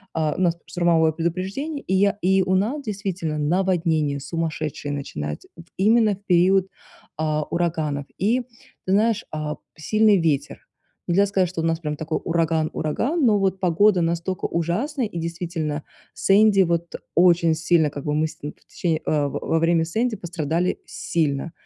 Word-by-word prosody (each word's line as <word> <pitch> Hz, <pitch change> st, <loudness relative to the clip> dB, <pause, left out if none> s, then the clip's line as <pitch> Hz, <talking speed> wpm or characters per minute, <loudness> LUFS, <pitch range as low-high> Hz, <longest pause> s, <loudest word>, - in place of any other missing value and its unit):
э, 155 Hz, -2 st, +1 dB
у -, -, -4 dB
нас 175 Hz, -3 st, +2 dB
пс 170 Hz, -, -30 dB
штормовое 170 Hz, -2 st, +3 dB
предупреждение, 190 Hz, -, -3 dB
и 190 Hz, -, -1 dB
я 200 Hz, +1 st, +3 dB
и 190 Hz, +1 st, +3 dB
у 185 Hz, 0 st, +1 dB
нас 230 Hz, +10 st, 0 dB
действительно 190 Hz, -, -3 dB
наводнение 160 Hz, -3 st, +1 dB
сумасшедшее 155 Hz, -1 st, -3 dB
начинается. 75 Hz, -, -5 dB
М, 170 Hz, -, -12 dB
именно 215 Hz, +2 st, +4 dB
в 200 Hz, -, -24 dB
период, 185 Hz, +1 st, +4 dB, 0.5 s
а, 155 Hz, -1 st, 0 dB
ураганов. 155 Hz, -4 st, -2 dB
И 225 Hz, +7 st, +1 dB, 0.4 s
ты 190 Hz, -, +1 dB
знаешь, 220 Hz, +1 st, +2 dB
а, 155 Hz, -1 st, -4 dB, 0.2 s
сильный 215 Hz, +6 st, +3 dB
ветер. 150 Hz, -3 st, -1 dB, 0.4 s
Нельзя 190 Hz, +3 st, +3 dB
сказать, 190 Hz, -3 st, +1 dB
что 180 Hz, -, -6 dB
у 165 Hz, -, -1 dB
нас 165 Hz, 0 st, 0 dB
прям 150 Hz, -2 st, -3 dB
такой 160 Hz, +1 st, -2 dB
ураган-ураган, 165 Hz, -, 0 dB
но 215 Hz, -3 st, +4 dB
вот 190 Hz, -1 st, 0 dB
погода 185 Hz, +2 st, +3 dB
настолько 170 Hz, +2 st, -2 dB
ужасная 225 Hz, -, -1 dB
и, 175 Hz, -5 st, -5 dB
действительно, 165 Hz, -3 st, -3 dB, 0.3 s
"Сэнди"- 200 Hz, 0 st, +4 dB
вот 170 Hz, -1 st, -1 dB, 0.2 s
очень 170 Hz, -2 st, +4 dB
сильно 160 Hz, -1 st, +2 dB
как 145 Hz, -1 st, -8 dB
бы 150 Hz, -, 0 dB
мы 155 Hz, +1 st, +1 dB
с -, -, -14 dB
ним 145 Hz, -, -5 dB
в -, -, -30 dB
течение, 165 Hz, -3 st, -2 dB
э, 150 Hz, -2 st, +1 dB
в -, -, -6 dB
во 165 Hz, -, -1 dB
время 165 Hz, 0 st, +3 dB
"Сэнди" 220 Hz, +8 st, -1 dB
пострадали 170 Hz, -1 st, -2 dB
сильно. 155 Hz, -1 st, -2 dB
170 Hz, 165 wpm, -23 LUFS, 155-195 Hz, 0.5 s, именно